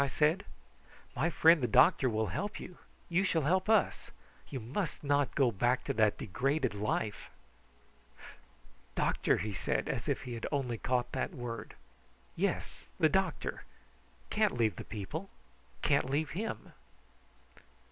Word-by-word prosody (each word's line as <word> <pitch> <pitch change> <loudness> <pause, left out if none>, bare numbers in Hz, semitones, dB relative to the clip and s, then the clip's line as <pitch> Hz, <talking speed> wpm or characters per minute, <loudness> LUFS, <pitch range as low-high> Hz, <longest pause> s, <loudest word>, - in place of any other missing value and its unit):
I - - 0
said. 150 +6 +2 0.7
"My 145 +7 +1
friend 165 -1 +5
the 125 - +1
doctor 130 +3 +5
will 110 -1 0
help 205 +2 -3
you. 180 - -10 0.3
You 175 +2 +2
shall 165 -5 +1
help 185 +7 +1
us. 220 -3 +2 0.4
You 135 - -4
must 140 - -3
not 145 -1 +1
go 130 -4 +4
back 120 +5 +1
to - - -2
that 110 -1 +3
degraded 130 - 0
life." 105 0 -2 1.7
"Doctor!" - - +2
he 105 0 -3
said, - - -1
as - - -2
if - - -1
he 125 - -6
had 115 - -4
only 125 -6 -1
caught 125 -1 0
that 180 - -2
word. 115 -4 -6 0.6
"Yes, - - -2
the 155 - +5
doctor. 190 +2 -1 0.7
Can't 210 - +2
leave 110 -3 +1
the - - -5
people 115 - -5 0.5
can't - - +2
leave 145 +3 0
him." 215 +6 -5
135 Hz, 145 wpm, -32 LUFS, 115-170 Hz, 1.7 s, friend